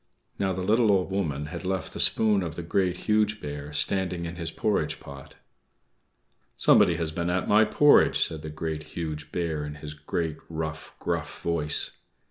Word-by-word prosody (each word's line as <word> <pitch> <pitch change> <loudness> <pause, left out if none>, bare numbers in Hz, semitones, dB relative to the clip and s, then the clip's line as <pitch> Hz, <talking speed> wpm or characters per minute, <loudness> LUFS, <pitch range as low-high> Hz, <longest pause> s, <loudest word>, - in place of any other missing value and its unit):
Now, 95 -1 +1
the 95 0 -3
little 110 +2 +3
Old 95 -1 +1
Woman 75 -7 -2
had 85 +4 -7
left 95 0 -3
the - - -7
spoon 105 -3 +4
of 80 -3 -4
the 85 - -5
Great, 90 +1 0
Huge 105 0 +2
Bear 75 0 -6
standing 90 +2 +2
in 85 +1 -6
his 85 -2 -3
porridge 105 +5 -1
pot. 70 0 -12 1.2
"=Somebody - - +5
has 80 -2 -2
been 85 +2 -2
at 90 +1 -1
my 110 +1 +5
porridge!=" 145 +7 +5
said 80 -1 +1
the 80 - -6
Great, 80 0 -4 0.2
Huge 75 -3 -5
Bear, 80 -4 -2
in 75 0 -6
his 75 0 -8
great, 75 +1 -3
rough, 80 -1 -5
gruff - - -4
voice. 75 -3 0
85 Hz, 175 wpm, -26 LUFS, 75-95 Hz, 1.2 s, =Somebody